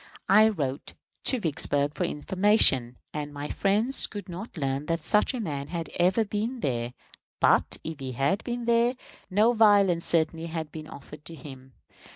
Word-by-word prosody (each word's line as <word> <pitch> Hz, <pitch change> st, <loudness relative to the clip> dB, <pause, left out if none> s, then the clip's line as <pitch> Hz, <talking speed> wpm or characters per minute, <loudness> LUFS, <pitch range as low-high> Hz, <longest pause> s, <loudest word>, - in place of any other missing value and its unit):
I 215 Hz, +3 st, +7 dB
wrote 140 Hz, -9 st, -4 dB, 0.3 s
to 255 Hz, -, +2 dB
Vicksburg 145 Hz, -4 st, 0 dB
for 180 Hz, -, -1 dB
information, 170 Hz, -, +2 dB, 0.2 s
and 150 Hz, -1 st, -4 dB
my 145 Hz, 0 st, -6 dB
friends 215 Hz, +7 st, +2 dB
could 205 Hz, -1 st, -8 dB
not 185 Hz, +3 st, -8 dB
learn 135 Hz, 0 st, -2 dB
that 165 Hz, -1 st, -1 dB
such 210 Hz, -, +2 dB
a -, -, -3 dB
man 145 Hz, -9 st, -4 dB
had 165 Hz, -1 st, -5 dB
ever 185 Hz, +6 st, +3 dB
been 220 Hz, +5 st, -3 dB
there; 120 Hz, -, -2 dB, 0.5 s
but, -, -, +3 dB
if 160 Hz, -2 st, -6 dB
he 130 Hz, -1 st, -5 dB
had 140 Hz, -, 0 dB
been 240 Hz, -1 st, -4 dB
there, 235 Hz, +2 st, +3 dB, 0.3 s
no 215 Hz, +5 st, +3 dB
violence 200 Hz, -6 st, +4 dB
certainly 165 Hz, 0 st, 0 dB
had 160 Hz, -2 st, -5 dB
been 155 Hz, -1 st, -8 dB
offered 150 Hz, +1 st, -12 dB
to 165 Hz, -, -7 dB
him. 130 Hz, -2 st, -12 dB
165 Hz, 170 wpm, -27 LUFS, 145-210 Hz, 0.5 s, I